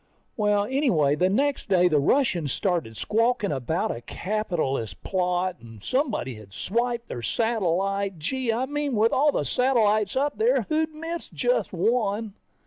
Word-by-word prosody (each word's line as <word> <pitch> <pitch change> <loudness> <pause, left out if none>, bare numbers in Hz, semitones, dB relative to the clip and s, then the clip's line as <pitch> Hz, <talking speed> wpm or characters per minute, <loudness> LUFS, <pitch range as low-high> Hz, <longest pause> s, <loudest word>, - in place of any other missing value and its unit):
Well, 210 -1 +2
anyway 215 - +2
the 180 +5 +2
next 275 +6 0
day, 180 -2 +5
the 155 -4 +3
Russians 170 - +1
started 170 - -1
squawking 230 -1 +1
about 160 - -1
a 115 - -8
capitalist 155 - -3
plot, 180 -1 0
and 115 -3 -13
someone 260 - 0
had 110 -6 -9
swiped 235 - -2
their 120 - -5
satellite. 195 - 0
Gee, 245 - -1
I 240 +3 0
mean 290 -1 -2
with 220 +2 +3
all 295 +2 +4
the 150 - -1
satellites 215 - +2
up 285 +6 0
there, 475 +3 +3
who'd 315 0 0
miss 330 +2 -5
just - - 0
one? 220 -3 0
210 Hz, 150 wpm, -25 LUFS, 170-255 Hz, -, day